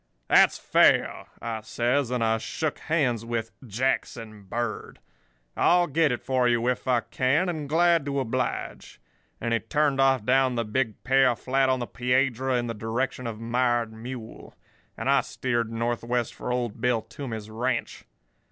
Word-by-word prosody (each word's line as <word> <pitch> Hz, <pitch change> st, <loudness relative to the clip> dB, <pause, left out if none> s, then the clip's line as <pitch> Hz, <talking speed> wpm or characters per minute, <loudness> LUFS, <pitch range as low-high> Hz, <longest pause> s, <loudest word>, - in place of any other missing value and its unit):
"'That's -, -, +5 dB
fair,' -, -, +3 dB, 0.2 s
I 115 Hz, -2 st, -3 dB
says, 120 Hz, +4 st, 0 dB
and 125 Hz, -2 st, 0 dB
I 110 Hz, 0 st, +2 dB
shook 155 Hz, +6 st, -3 dB
hands 130 Hz, -8 st, 0 dB
with 115 Hz, -1 st, -3 dB, 0.2 s
Jackson 110 Hz, -2 st, -2 dB
Bird. 115 Hz, +2 st, -4 dB, 0.6 s
'I'll 175 Hz, 0 st, +4 dB
get 155 Hz, -1 st, +2 dB
it 125 Hz, -, -3 dB
for 130 Hz, -2 st, +1 dB
you 120 Hz, 0 st, +1 dB
if 125 Hz, +1 st, -1 dB
I 125 Hz, -2 st, +3 dB
can, 135 Hz, +10 st, +1 dB
and 155 Hz, -5 st, -4 dB
glad 170 Hz, -1 st, +3 dB
to 140 Hz, 0 st, -1 dB
oblige.' 130 Hz, -, -3 dB, 0.4 s
And 115 Hz, 0 st, -1 dB
he 115 Hz, -, +2 dB
turned 140 Hz, +3 st, +1 dB
off 135 Hz, -4 st, +3 dB
down 130 Hz, 0 st, +3 dB
the 115 Hz, -1 st, -1 dB
big 110 Hz, 0 st, -2 dB
pear 130 Hz, -1 st, +4 dB
flat 135 Hz, +2 st, +1 dB
on 130 Hz, -, +2 dB
the 120 Hz, -, -3 dB
Piedra, 125 Hz, +1 st, 0 dB
in 120 Hz, -, -1 dB
the 115 Hz, -, -3 dB
direction 115 Hz, +3 st, -3 dB
of 110 Hz, -2 st, -6 dB
Mired 120 Hz, -1 st, 0 dB
Mule; 115 Hz, 0 st, -9 dB, 0.4 s
and -, -, -4 dB
I -, -, +4 dB
steered 120 Hz, -3 st, -2 dB
northwest 120 Hz, +1 st, -1 dB
for 125 Hz, -, -5 dB
old 120 Hz, -3 st, -2 dB
Bill 120 Hz, -3 st, +1 dB
Toomey's 110 Hz, -6 st, -7 dB
ranch. 120 Hz, +2 st, -2 dB
125 Hz, 160 wpm, -26 LUFS, 115-135 Hz, 0.6 s, That's